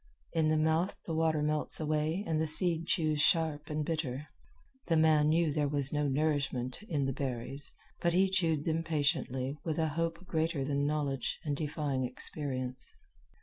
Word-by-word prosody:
In 160 -2 +2
the 155 - +3
mouth 160 +4 +1
the 165 - -3
water 160 -1 +1
melts 150 0 +2
away 155 +4 0
and 160 -1 0
the 160 - 0
seed 165 +1 +1
chews 155 -4 +1
sharp 155 -2 +2
and 150 0 -2
bitter. 150 -3 -3 0.6
The 165 - +3
man 155 -1 +4
knew 160 -1 +2
there 150 -1 +1
was 140 -1 +4
no 150 -1 +1
nourishment 135 -3 0
in 145 -5 0
the 135 - -1
berries, 135 +1 -5 0.2
but 170 0 +1
he 190 +2 +4
chewed 165 -6 +1
them 165 0 +1
patiently 145 -3 -1
with 160 -3 -2
a 160 -1 +1
hope 165 +3 -2
greater 160 -4 -1
than 140 0 0
knowledge 145 -4 -1
and 145 -2 0
defying 145 -3 -2
experience. 130 0 -3
155 Hz, 170 wpm, -32 LUFS, 140-160 Hz, 0.6 s, man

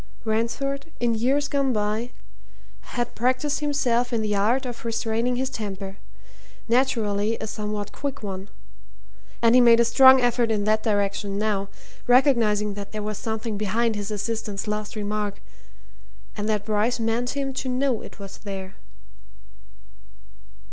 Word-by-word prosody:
Ransford, 275 +7 -1
in 235 -1 +2
years 265 +6 +1
gone 275 -2 +1
by, 215 +2 -1 0.9
had 240 -1 -1
practised 255 +5 +1
himself 250 -5 +1
in 225 -2 0
the 210 -1 0
art 235 +7 +2
of 245 -2 -6
restraining 230 +1 0
his 260 +1 -1
temper 195 -3 -5 0.7
naturally 225 -3 +1
a - - -5
somewhat 210 -1 -4
quick 280 -5 -5
one. 195 -1 -5 0.9
And 230 0 +6
he 250 - +7
made 235 -1 +7
a 235 - +5
strong 260 +3 +7
effort 245 -1 +2
in 210 -2 +1
that 215 +1 +2
direction 200 -2 0
now, 200 -2 -1 0.4
recognizing 230 -5 +4
that 200 0 -8
there 215 -1 -3
was 210 -1 -4
something 220 -1 -3
behind 220 +2 +1
his 205 0 -4
assistant's 210 -1 -3
last 210 +1 -3
remark, 210 -1 -3 1.0
and 210 0 -3
that 210 -1 0
Bryce 215 +3 +1
meant 230 +4 -1
him 270 -1 -2
to 260 0 -3
know 255 -2 0
it - - -11
was 195 -1 -9
there. 195 -1 -7
225 Hz, 145 wpm, -24 LUFS, 210-245 Hz, 1.0 s, he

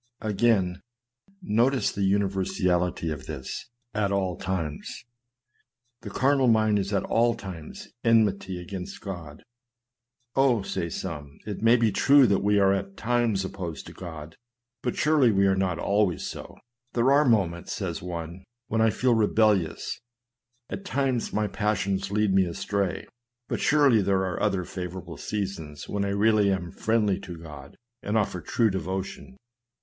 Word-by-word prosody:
Again, 105 -4 +1 0.6
notice 125 +1 +2
the 100 - -4
universality 95 -3 +1
of 70 -3 -6
this 70 - -6 0.2
at 105 -2 0
all 95 -3 0
times. 85 -3 -4 1.0
The - - -7
carnal 135 0 +2
mind 110 -2 +4
is 100 +1 -3
at 100 - +1
all 120 +1 +2
times 85 -6 -9 0.2
enmity 100 -5 +2
against 90 +1 -7
God. 85 -7 -8 0.5
" 120 0 -52
Oh," 130 -6 +3
say 85 - -3
some, 75 -2 -6
" - - -31
it 105 -2 -5
may 115 +2 +6
be 115 -3 +2
true 140 +6 +6
that 100 -4 +2
we 105 +1 +3
are 100 -1 +4
at 100 0 -4
times 115 -4 +1
opposed 90 -5 -6
to - - -10
God, 80 -3 -9 0.4
but 125 - -2
surely 150 -6 +4
we 100 -1 +3
are 95 0 +3
not 95 -3 0
always 100 -2 +1
so." - - -8 0.2
" 125 +1 -50
There 120 0 +1
be 140 +1 +5
moments," 90 -6 +1
says - - -4
one, 85 +1 -6
" 120 - -61
when 110 +1 +1
I 110 - +5
feel 125 +3 +2
rebel 110 -1 +4
lious; 85 -5 -4 0.7
at 195 - -6
times 135 - -1
my 105 0 0
passions 100 -1 -1
lead 105 -1 +1
me 95 -1 +4
astray; 95 +2 -2 0.4
but - - -2
surely 140 -7 +4
there 95 -1 +1
are 90 -2 -3
other 95 -3 +1
favorable 90 -2 -7
seasons 95 -8 -5
when 100 -1 -1
I - - -1
really 105 0 +3
am 90 -3 -2
friendly 110 -3 +1
to 90 -3 -8
God, 75 -4 -11 0.2
and 105 +2 -1
offer 100 -4 -1
true 110 +7 +1
devotion. 95 -6 -5
100 Hz, 160 wpm, -26 LUFS, 90-110 Hz, 1.0 s, may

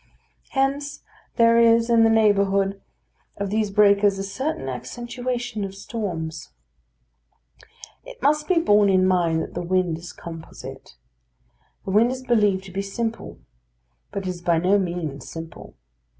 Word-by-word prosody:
Hence 280 +1 -1 0.3
there 230 -1 +5
is 230 0 +5
in 230 -1 +4
the 225 - +5
neighbourhood 200 -3 +2 0.6
of 200 -1 -3
these 215 -1 0
breakers 200 -1 +4
a 195 - -3
certain 200 - -3
accentuation 240 - -4
of 195 0 -5
storms. 175 -7 -5 1.5
It - - -12
must 300 +3 +1
be 370 - +2
borne 210 -10 +4
in 185 -1 +4
mind 170 -3 +2
that - - -9
the 175 - -3
wind 175 -2 0
is 170 - -9
composite. 165 -1 -10 0.9
The 190 - -3
wind 220 +4 +4
is 255 0 -5
believed 210 -6 +2
to 195 - -11
be 195 +2 -2
simple; 225 +3 -5 0.7
but 195 - -4
it - - -2
is 180 -1 -6
by 170 -1 +2
no 185 +5 +3
means 170 -7 -4
simple. 165 0 -9
200 Hz, 145 wpm, -23 LUFS, 180-230 Hz, 1.5 s, there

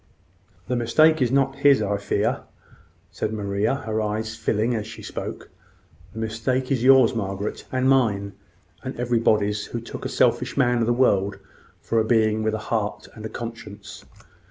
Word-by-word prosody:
"The 125 - -1
mistake 155 +7 +4
is 125 -2 +2
not 135 0 +1
his, 140 -1 +5
I 105 -1 0
fear," 100 - 0 0.7
said 110 - -3
Maria, 100 +2 -1
her 110 0 -1
eyes 110 +1 -2
filling 110 +3 0
as 110 -2 -3
she 110 - -10
spoke. - - -7 0.6
"The - - -12
mistake 115 +4 -2
is 125 -3 +1
yours, 130 -2 +6
Margaret, 100 -2 -4
and 130 0 +1
mine, 105 -7 +2 0.5
and 130 -1 -6
everybody's 110 -4 +1
who 120 - -5
took 115 - -8
a - - -3
selfish - - +1
man 125 -3 +3
of 115 - +1
the - - +3
world 100 -6 +2 0.4
for 115 - 0
a - - +3
being 110 -1 +2
with 110 0 0
a 110 - -8
heart 105 -2 -2
and 110 - -11
a - - -12
conscience." 110 -3 -8
110 Hz, 170 wpm, -24 LUFS, 105-125 Hz, 0.7 s, yours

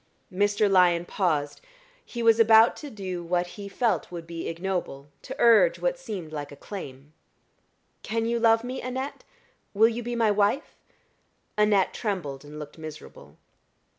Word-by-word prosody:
Mr. 205 +2 +2
Lyon 180 -3 +4
paused: 155 -7 -1 0.4
he 235 -1 -6
was 225 0 +5
about 225 0 +6
to 295 - -8
do 185 -6 -5
what 175 +1 0
he 200 -1 -8
felt 230 0 -1
would 170 -2 -7
be 165 0 -6
ignoble 165 -5 -4
to 265 - -8
urge 235 - +5
what - - 0
seemed 180 - -7
like 145 -1 -5
a - - -10
claim. 145 -6 -9 0.9
"Can 225 0 -2
you 235 +1 0
love 225 0 +4
me, 255 +2 -5
Annette? 260 +2 -5 0.5
Will 220 +3 +6
you 235 +1 -4
be 240 +1 -4
my 225 -2 +3
wife?" 205 +7 0 0.8
Annette 210 -3 +3
trembled 170 - -4
and 150 +1 -11
looked 150 +1 -9
miserable. 155 -1 -11
200 Hz, 155 wpm, -26 LUFS, 165-230 Hz, 0.9 s, about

